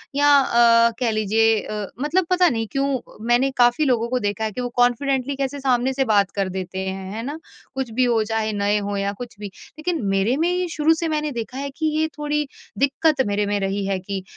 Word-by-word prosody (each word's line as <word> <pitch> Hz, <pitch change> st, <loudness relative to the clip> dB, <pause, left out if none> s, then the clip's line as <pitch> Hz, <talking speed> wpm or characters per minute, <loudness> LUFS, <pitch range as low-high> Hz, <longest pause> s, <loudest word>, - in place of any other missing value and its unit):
या 290 Hz, +1 st, +3 dB
अ, 235 Hz, -2 st, +4 dB
कह 235 Hz, -3 st, +1 dB
लीजिए 220 Hz, +1 st, +2 dB
अ, 210 Hz, -1 st, -5 dB, 0.2 s
मतलब 335 Hz, +6 st, +1 dB
पता 365 Hz, -1 st, +4 dB
नहीं 225 Hz, -3 st, -2 dB
क्यों 275 Hz, -1 st, 0 dB, 0.3 s
मैंने 245 Hz, +3 st, +3 dB
काफ़ी 245 Hz, +5 st, +4 dB
लोगों 235 Hz, -3 st, +1 dB
को 255 Hz, 0 st, 0 dB
देखा 220 Hz, +2 st, -6 dB
है 220 Hz, -, -1 dB
कि 250 Hz, -, -5 dB
वो 245 Hz, -, -3 dB
कॉन्फिडेंटली 260 Hz, +2 st, +1 dB
कैसे 275 Hz, +1 st, -3 dB
सामने 260 Hz, -1 st, +1 dB
से 270 Hz, -, +1 dB
बात 200 Hz, -3 st, +3 dB
कर 195 Hz, -2 st, -2 dB
देते 185 Hz, 0 st, -5 dB
हैं। 190 Hz, 0 st, -5 dB
है 225 Hz, +2 st, -5 dB
ना, 290 Hz, +4 st, -5 dB, 0.4 s
कुछ 265 Hz, -2 st, -2 dB
भी 255 Hz, +3 st, +1 dB
हो 230 Hz, -2 st, +2 dB
चाहे, 220 Hz, 0 st, -1 dB
नए 205 Hz, 0 st, +1 dB
हो 205 Hz, 0 st, -3 dB
या 200 Hz, 0 st, -1 dB
कुछ 240 Hz, +2 st, -9 dB
भी। 205 Hz, -, -5 dB, 0.3 s
लेकिन 335 Hz, -1 st, -2 dB
मेरे 195 Hz, +6 st, +1 dB
में 335 Hz, +2 st, +1 dB
ही 360 Hz, 0 st, 0 dB
शुरू 320 Hz, 0 st, +2 dB
से 330 Hz, +1 st, -2 dB
मैंने 305 Hz, -1 st, -1 dB
देखा 235 Hz, +1 st, -5 dB
है 280 Hz, +1 st, -3 dB
कि 315 Hz, -, -2 dB
ये 315 Hz, -, +2 dB
थोड़ी 295 Hz, 0 st, -1 dB, 0.3 s
दिक्कत 280 Hz, +1 st, +2 dB
मेरे 205 Hz, 0 st, 0 dB
में 205 Hz, 0 st, -1 dB
रही 195 Hz, 0 st, -2 dB
है 195 Hz, -1 st, 0 dB
कि 190 Hz, 0 st, -5 dB
240 Hz, 225 wpm, -22 LUFS, 210-280 Hz, 0.4 s, अ